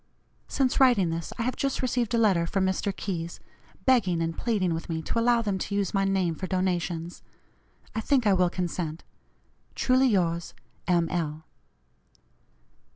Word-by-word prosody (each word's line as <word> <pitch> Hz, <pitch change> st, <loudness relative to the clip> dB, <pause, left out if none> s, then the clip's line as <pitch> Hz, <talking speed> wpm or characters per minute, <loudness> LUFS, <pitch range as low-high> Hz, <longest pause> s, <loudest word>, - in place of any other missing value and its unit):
Since 265 Hz, -2 st, +1 dB
writing 235 Hz, -10 st, +4 dB
this, 165 Hz, 0 st, -4 dB
I 230 Hz, -, -1 dB
have 255 Hz, +2 st, -1 dB
just 275 Hz, -1 st, -2 dB
received 245 Hz, -2 st, 0 dB
a -, -, +2 dB
letter 190 Hz, -7 st, +3 dB
from 190 Hz, +2 st, 0 dB
Mr. 190 Hz, +2 st, 0 dB
Keyes, 170 Hz, -4 st, -5 dB, 0.5 s
begging 200 Hz, -10 st, +3 dB
and 165 Hz, 0 st, -1 dB
pleading 205 Hz, -7 st, 0 dB
with 165 Hz, +1 st, -5 dB
me 160 Hz, -1 st, -1 dB
to 230 Hz, -, -1 dB
allow 235 Hz, 0 st, +3 dB
them 200 Hz, -3 st, -1 dB
to 200 Hz, -, -3 dB
use 200 Hz, -2 st, -1 dB
my 195 Hz, -1 st, +2 dB
name 190 Hz, -3 st, +1 dB
for 185 Hz, +4 st, -5 dB
donations. 175 Hz, -2 st, -2 dB, 0.7 s
I 220 Hz, -, -2 dB
think 260 Hz, 0 st, +2 dB
I 205 Hz, -, +5 dB
will 180 Hz, -1 st, +3 dB
consent. 175 Hz, -3 st, -3 dB, 0.7 s
"Truly 260 Hz, +1 st, +3 dB
yours, 170 Hz, -6 st, 0 dB, 0.3 s
M. 170 Hz, -2 st, +3 dB
L." 160 Hz, -3 st, -3 dB
190 Hz, 160 wpm, -27 LUFS, 170-230 Hz, 0.7 s, I